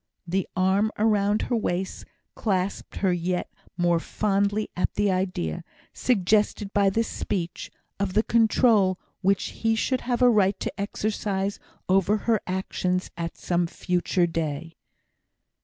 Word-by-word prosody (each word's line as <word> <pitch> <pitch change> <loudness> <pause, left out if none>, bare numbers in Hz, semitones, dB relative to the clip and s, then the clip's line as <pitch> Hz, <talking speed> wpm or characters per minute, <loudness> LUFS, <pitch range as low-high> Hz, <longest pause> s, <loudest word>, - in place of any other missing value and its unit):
The 185 +2 -1
arm 190 +3 +2
around 210 -1 +2
her 245 - 0
waist 190 -4 -2 0.3
clasped 195 -2 -2
her 190 -2 +1
yet 175 +1 -2 0.2
more 175 -1 +3
fondly 205 +3 0
at 180 - -1
the 205 -1 +2
idea, 180 - -2 0.3
suggested 210 -2 +1
by 200 -1 +4
this 225 +4 0
speech, 175 -4 -3 0.3
of 200 -2 -1
the 215 - +3
control 220 -4 +3 0.2
which 195 0 +1
he 225 0 +3
should 255 +3 0
have 245 0 0
a - - +8
right 200 -3 +3
to - - -3
exercise 200 -1 -2 0.3
over 195 +3 +3
her 220 0 +1
actions 185 0 -1
at 170 -1 -5
some 175 -1 0
future 180 +1 0
day. 165 -1 -3
195 Hz, 135 wpm, -25 LUFS, 180-210 Hz, 0.3 s, a